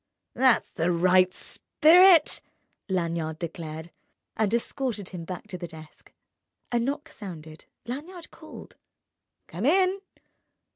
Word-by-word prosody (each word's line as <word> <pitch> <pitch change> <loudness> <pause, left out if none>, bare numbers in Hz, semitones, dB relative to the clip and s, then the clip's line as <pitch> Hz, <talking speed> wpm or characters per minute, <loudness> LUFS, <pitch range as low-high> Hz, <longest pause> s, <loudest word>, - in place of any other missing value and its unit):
"That's 255 -1 +3
the 170 +2 0
right 185 +1 +4
spirit!" 345 - +4 0.5
Lanyard 170 -3 -2
declared, 160 -1 -7 0.4
and 215 -2 0
escorted 235 -3 -2
him 170 -3 -8
to 180 0 -7
the 175 - -5
desk. 160 -1 -14 0.6
A 240 - +2
knock 285 +6 -3
sounded. 160 -6 -10 0.2
Lanyard 325 +8 -8
called: - - -13 0.7
"Come 200 +9 -3
in!" 375 +4 +3
190 Hz, 105 wpm, -26 LUFS, 170-280 Hz, 0.7 s, right